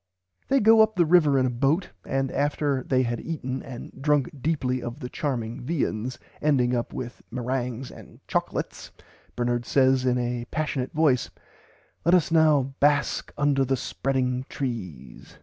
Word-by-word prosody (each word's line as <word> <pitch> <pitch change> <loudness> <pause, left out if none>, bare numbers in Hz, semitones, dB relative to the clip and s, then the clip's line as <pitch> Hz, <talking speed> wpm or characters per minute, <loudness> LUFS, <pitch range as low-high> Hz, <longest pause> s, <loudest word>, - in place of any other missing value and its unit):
They 275 - +3
go 220 0 +6
up 220 0 +3
the 175 -2 +4
river 155 -4 +5
in 130 - +3
a 125 - 0
boat, 140 +9 0
and 135 -1 -1
after 145 -2 0
they 130 -1 +2
had 120 -1 -2
eaten 135 -5 -4
and 125 -3 -9
"drunk 145 -2 +2
deeply 130 -4 0
of 120 +4 -6
the 125 -4 -6
charming 125 -4 -3
viands 125 -4 -2 0.2
ending 125 -5 +2
up 120 - -2
with 125 -1 -6
merangs 125 0 -3
and - - -14
chocklates," - - -3 0.5
Bernard 120 0 0
says 130 0 +3
"in 125 -1 +2
a 120 -1 -2
passionate 140 -5 -2
voice 150 -5 +2 0.7
Let 170 +3 +5
us 170 -3 +2
now 150 -5 +4
bask 145 0 +2
under 145 -2 +2
the 135 0 0
spreading 130 -1 -1
trees. 95 - -6
135 Hz, 155 wpm, -25 LUFS, 125-150 Hz, 0.7 s, go